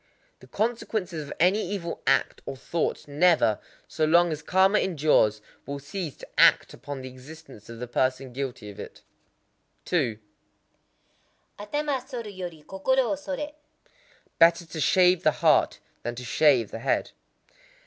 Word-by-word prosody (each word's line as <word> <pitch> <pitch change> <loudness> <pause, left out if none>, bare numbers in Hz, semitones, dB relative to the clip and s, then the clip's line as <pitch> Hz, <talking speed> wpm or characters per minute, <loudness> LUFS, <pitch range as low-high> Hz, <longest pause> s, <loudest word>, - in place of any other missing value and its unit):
The - - -16
consequence 220 -4 -2
of 155 -3 -6
any 185 +5 +4
evil 175 -3 -4
act 135 - +2
or 135 - -5
thought 165 +4 -3
never,—so 150 -1 +1
long 170 +2 +4
as 155 0 -4
karma 190 +6 +3
endures,—will 140 - 0
cease 145 +2 -6
to - - -11
act - - +5
upon 145 -2 -7
the 130 - -7
existence 130 -3 -13
of 115 - -8
the 125 - -5
person 130 +1 -1
guilty 125 -5 -5
of 100 - -14
it. - - -10 0.8
2.—Atama 205 - -6
soru 235 -6 -6
yori 175 -4 -7
kokoro 255 +6 +1
wo - - +1
soré. 290 +1 -5 0.9
Better 170 +1 +5
to 160 0 -8
shave 180 +4 +4
the 155 - +4
heart - - +3 0.2
than 120 +1 -4
to 125 - -7
shave 130 -3 +3
the 115 - -6
head. - - 0
160 Hz, 140 wpm, -26 LUFS, 130-190 Hz, 0.9 s, act